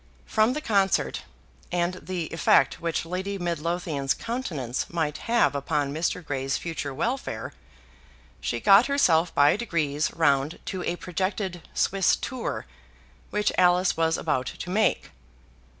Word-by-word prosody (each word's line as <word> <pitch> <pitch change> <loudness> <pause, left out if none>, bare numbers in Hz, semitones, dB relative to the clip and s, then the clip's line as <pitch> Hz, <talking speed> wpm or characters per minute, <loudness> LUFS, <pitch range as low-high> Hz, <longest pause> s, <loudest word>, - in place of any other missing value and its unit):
From 220 +2 +2
the 305 - -3
concert, 200 -7 +1 0.5
and 175 0 0
the 180 -3 -3
effect 150 -4 +3
which 165 -1 -1
Lady 190 +4 -3
Midlothian's 170 -5 -1
countenance 160 - -3
might 160 -3 -2
have 235 -8 +4
upon 140 0 -1
Mr. 165 +2 -2
Grey's 135 -2 -1
future 165 -4 -4
welfare, 235 - -3 0.9
she - - -2
got 200 +4 +6
herself 180 - +3
by 145 +1 +5
degrees 155 -9 -1
round 145 -2 +2
to 185 - -4
a 175 - -1
projected 185 0 -3
Swiss 195 -1 +3
tour 255 -3 -4 0.6
which 210 0 +1
Alice 180 0 +4
was 165 0 +1
about 130 -5 -1
to 180 - -6
make. 215 +3 +1
175 Hz, 130 wpm, -26 LUFS, 150-195 Hz, 0.9 s, got